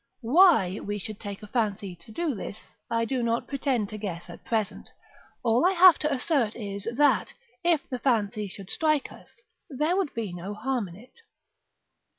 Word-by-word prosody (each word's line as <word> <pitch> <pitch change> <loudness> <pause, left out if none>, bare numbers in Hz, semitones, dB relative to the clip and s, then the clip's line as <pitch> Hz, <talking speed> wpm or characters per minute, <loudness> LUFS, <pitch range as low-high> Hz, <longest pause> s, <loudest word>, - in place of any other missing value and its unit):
(Why 245 - +5
we 205 0 -4
should 210 +1 -6
take 205 0 -7
a - - -8
fancy 205 -5 -1
to 170 +6 -16
do 320 +5 -1
this, 205 -1 -8
I 230 0 +1
do 255 +1 -1
not 235 0 0
pretend 260 -6 -1
to 215 - -7
guess 175 -4 -5
at 170 - -12
present; 220 -3 -2 0.5
all 235 +2 +3
I 370 +2 +4
have 365 -1 +8
to 300 - 0
assert 260 -4 +1
is, 200 -3 -6
that, 290 0 +3 0.3
if 340 -4 +2
the 250 - -4
fancy 215 -5 0
should 195 0 -8
strike 305 -3 +1
us, - - -15 0.4
there 300 +5 0
would 380 -6 -1
be 220 -6 -3
no 185 +4 -6
harm 245 -1 -1
in 170 - -12
it). 250 - -17
230 Hz, 180 wpm, -27 LUFS, 205-280 Hz, 0.5 s, have